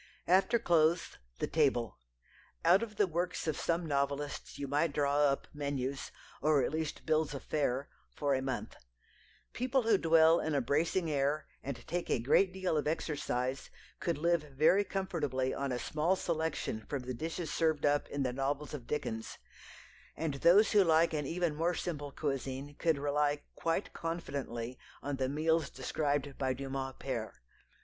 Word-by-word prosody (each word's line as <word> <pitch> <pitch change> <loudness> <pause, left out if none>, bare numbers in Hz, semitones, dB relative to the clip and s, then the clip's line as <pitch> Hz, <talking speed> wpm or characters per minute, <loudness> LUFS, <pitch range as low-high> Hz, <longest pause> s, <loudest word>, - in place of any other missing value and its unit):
After 190 +6 +4
clothes, 170 -5 +2 0.2
the - - -1
table. 130 - +1 0.7
Out 190 - +6
of 220 -2 -5
the 205 - +4
works 175 +1 -2
of 155 -2 0
some 170 +2 0
novelists 140 -1 -2
you 140 - -4
might 145 +3 +1
draw 145 0 +2
up 140 -1 +1
menus, 140 -2 -3 0.3
or 150 -2 +4
at - - 0
least 155 -1 -3
bills 155 -2 +1
of 140 - -6
fare, 140 -2 0 0.3
for 145 -2 +1
a 130 - +1
month. 130 -1 -3 0.8
People 255 +1 +1
who 220 -3 +4
dwell 165 0 +5
in 155 -1 -1
a - - +4
bracing 160 +6 +1
air, 145 +2 +1 0.2
and 135 -3 -6
take 175 +1 -3
a - - +3
great 145 +11 +3
deal 185 -3 -1
of 150 - 0
exercise, 135 -4 -2 0.3
could 170 -3 -1
live 170 +1 +2 0.2
very 180 +7 +5
comfortably 150 -10 -1
on 140 -1 -2
a 125 - 0
small 155 +8 +1
selection 160 -10 -2
from 140 -3 -2
the 130 0 -4
dishes 160 +5 -4
served 160 -3 +1
up 145 0 +2
in 145 -1 -2
the 125 -1 -1
novels 140 +3 -2
of 130 -5 -7
Dickens, 110 -7 -3 0.8
and 155 -1 -1
those 175 +9 +5
who 205 -2 +6
like 165 -1 +4
an 150 -3 -1
even 170 -1 0
more 170 +3 +1
simple 145 -5 -4
cuisine 135 0 -3
could 165 -3 +2
rely 145 +1 0
quite 165 +4 -1
confidently 135 -7 -4 0.2
on 145 -1 -2
the 130 -1 0
meals 155 +1 +1
described 140 +1 -2
by 130 -1 +1
Dumas 135 0 -4
père. 120 -5 -3
150 Hz, 165 wpm, -33 LUFS, 135-165 Hz, 0.8 s, Out